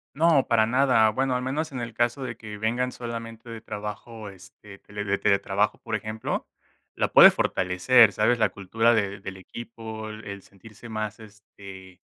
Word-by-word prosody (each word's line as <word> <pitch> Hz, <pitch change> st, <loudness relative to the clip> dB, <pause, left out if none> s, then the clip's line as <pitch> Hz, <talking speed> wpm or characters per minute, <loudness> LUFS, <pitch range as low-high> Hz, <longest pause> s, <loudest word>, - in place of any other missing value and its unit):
No, 155 Hz, -2 st, +4 dB
para 115 Hz, -2 st, +3 dB
nada. 125 Hz, -2 st, +3 dB
Bueno, 130 Hz, +3 st, 0 dB
al -, -, -4 dB
menos 145 Hz, +5 st, -3 dB
en 130 Hz, -, -5 dB
el 120 Hz, -1 st, -5 dB
caso 120 Hz, +4 st, 0 dB
de 120 Hz, -2 st, -5 dB
que 105 Hz, -2 st, -9 dB
vengan 120 Hz, +4 st, -1 dB
solamente 115 Hz, -1 st, -7 dB
de 115 Hz, -1 st, -8 dB
trabajo, 105 Hz, 0 st, -7 dB
este, 100 Hz, +1 st, -14 dB
te -, -, -22 dB
le 105 Hz, 0 st, -4 dB
le 100 Hz, 0 st, 0 dB
teletrabajo, 100 Hz, 0 st, +1 dB
por 115 Hz, -2 st, -4 dB
ejemplo, 110 Hz, +1 st, -4 dB, 0.5 s
la -, -, -1 dB
puedes -, -, +9 dB
fortalecer, 95 Hz, +6 st, +4 dB
¿sabes? 110 Hz, +5 st, +2 dB
La 110 Hz, -3 st, +2 dB
cultura 115 Hz, +5 st, +1 dB
de 100 Hz, -3 st, -1 dB
del 95 Hz, 0 st, -7 dB
equipo, 110 Hz, +2 st, -8 dB
el 105 Hz, -2 st, -8 dB
sentirse 105 Hz, +5 st, -15 dB
más, 110 Hz, 0 st, -5 dB
este, 100 Hz, -3 st, -14 dB
110 Hz, 175 wpm, -25 LUFS, 100-120 Hz, 0.5 s, puedes